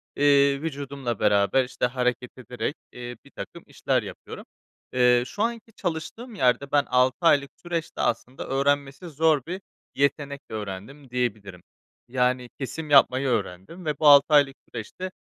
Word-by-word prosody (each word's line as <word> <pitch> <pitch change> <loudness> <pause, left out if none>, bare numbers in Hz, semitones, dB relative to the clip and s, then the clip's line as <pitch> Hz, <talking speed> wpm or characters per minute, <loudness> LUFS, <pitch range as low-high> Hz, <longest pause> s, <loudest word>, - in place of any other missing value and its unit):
eee, 140 -1 +4
vücudumla 140 -6 -4
beraber, 100 +6 +3
işte, 125 0 -2
hareket 125 -1 -1
ederek, 125 +3 -4 0.2
eee, 125 0 -7
birtakım - - -9
işler - - 0
yapıyorum. - - -9 0.5
Eee, 125 -1 +4
şu 205 - -3
anki 230 -1 -3
çalıştığım 200 +7 -5
yerde 135 -2 +1
ben 145 -1 +4
6 125 0 +2
aylık 145 -4 +4
süreçte 170 -2 -4
aslında 120 +2 -2
öğrenmesi 140 +4 0
zor 155 -1 +2
bir 185 +3 -5 0.3
yetenek 140 0 0
öğrendim 110 +6 -7
diyebilirim. 105 -7 -3 0.5
Yani 125 0 0
kesim 150 +3 -5
yapmayı 135 -1 +5
öğrendim 105 - -3
ve 150 -1 -2
bu 155 - +4
6 140 -1 +9
aylık 140 -2 +5
süreçte 180 - -6
135 Hz, 140 wpm, -25 LUFS, 125-150 Hz, 0.5 s, 6